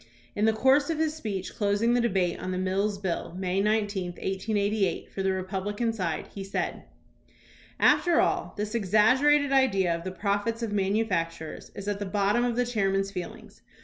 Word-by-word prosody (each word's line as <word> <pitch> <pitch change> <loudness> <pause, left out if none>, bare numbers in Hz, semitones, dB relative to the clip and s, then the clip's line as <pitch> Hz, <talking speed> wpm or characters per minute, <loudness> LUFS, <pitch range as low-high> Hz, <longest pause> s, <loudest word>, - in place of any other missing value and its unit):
In 210 - +1
the 220 - +5
course 270 +6 +3
of 325 - -1
his 315 -1 0
speech 205 -11 -5
closing 205 +3 +1
the 245 - +3
debate 190 -7 0
on 185 - -5
the 185 - -2
Mills 195 +2 0
Bill, 185 -3 -3
May 190 0 0
19, 205 -4 0
1888, 200 0 -1
for 195 - -3
the 190 0 +1
Republican 195 +4 -2
side, 175 -7 -2
he 195 - -6
said: 195 - -3 0.9
After 345 -2 +4
all, - - 0
this 210 +1 -3
exaggerated 255 +8 +3
idea 195 -10 +3
of 170 - -7
the 185 - -3
profits 205 +5 -1
of 225 - -2
manufac 195 -3 +1
turers 160 -1 -9
is 200 0 -7
at 205 -1 -1
the 205 - -3
bottom 205 +4 +1
of 245 -1 0
the 245 +1 +1
chairman's 195 -4 0
feelings. 180 -3 -8
205 Hz, 180 wpm, -27 LUFS, 190-225 Hz, 0.9 s, the